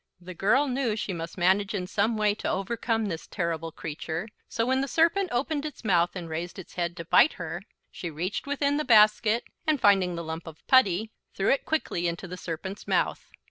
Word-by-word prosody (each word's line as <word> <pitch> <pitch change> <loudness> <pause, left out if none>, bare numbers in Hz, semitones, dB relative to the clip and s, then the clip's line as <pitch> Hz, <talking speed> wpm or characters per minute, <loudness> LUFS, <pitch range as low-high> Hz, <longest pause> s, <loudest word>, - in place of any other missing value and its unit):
The 180 +1 -9
girl 220 - +3
knew 250 -4 0
she 210 -3 -3
must 165 +1 -6
manage 190 +3 +2
in 180 -2 -2
some 210 +4 0
way 210 -1 +3
to 210 - -4
overcome 225 +3 -1
this 165 -5 -5
terrible 165 -2 -3
creature, 160 +5 -5 0.2
so 230 - 0
when 260 +2 +2
the 275 - -1
serpent 340 +7 +2
opened 285 +4 -1
its 300 -5 -7
mouth 175 -3 +2
and 175 -3 -5
raised 165 +2 -5
its 190 - -10
head 175 0 -2
to 170 - -6
bite 265 - +5
her, - - -5 0.3
she 175 - -5
reached 175 - -4
within 285 0 +1
the 305 - 0
basket, 215 -1 +5 0.2
and 305 -2 +3
finding 195 -5 +4
the 170 - -4
lump 160 +1 -6
of 160 -1 -11
putty, 220 -4 +4 0.2
threw 195 - +2
it 275 - +1
quickly 175 - -1
into 170 +3 -4
the 180 - -6
serpent's 185 +3 -6
mouth. - - 0
200 Hz, 205 wpm, -27 LUFS, 175-240 Hz, 0.3 s, bite